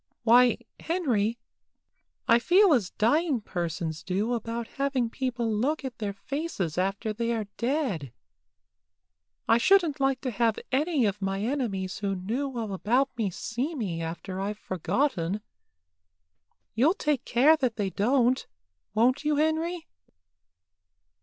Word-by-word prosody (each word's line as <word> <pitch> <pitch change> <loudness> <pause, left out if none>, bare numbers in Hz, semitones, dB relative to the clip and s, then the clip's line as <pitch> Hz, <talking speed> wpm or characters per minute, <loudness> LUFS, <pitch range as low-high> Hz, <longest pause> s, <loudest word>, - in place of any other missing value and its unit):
Why, 240 0 +6 0.2
Henry, 240 - 0 0.9
I 230 +1 +6
feel 365 - +5
as 215 -9 +1
dying 285 +5 +2
persons 170 -5 -4
do 200 +6 -1
about 230 0 -3
having 265 -4 0
people 240 -4 -2
look 275 +7 0
at 245 -3 -6
their 205 -2 -2
faces 205 - -3
after 195 +4 -1
they 230 +2 -1
are 220 -2 -2
dead. 235 - -1 1.4
I 230 - +5
shouldn't 345 -2 +4
like 270 -1 +1
to 255 - -2
have 230 -1 +1
any 290 -1 +2
of 205 0 -1
my 195 0 -1
enemies 215 -8 -2
who 200 -1 -1
knew 245 +8 -3
all 220 -4 -3
about 250 +7 +1
me 220 -5 0
see 245 - -3
me 185 - -3
after 175 +3 -5
I've 205 +1 -3
forgotten. 190 - -1 1.3
You'll 280 - +3
take 300 - 0
care 275 +7 +5
that 255 -6 0
they 200 -3 -2
don't, 250 +5 +2 0.5
won't 255 +6 +3
you, 300 0 +2
Henry?" 320 +3 0
235 Hz, 135 wpm, -27 LUFS, 200-275 Hz, 1.4 s, Why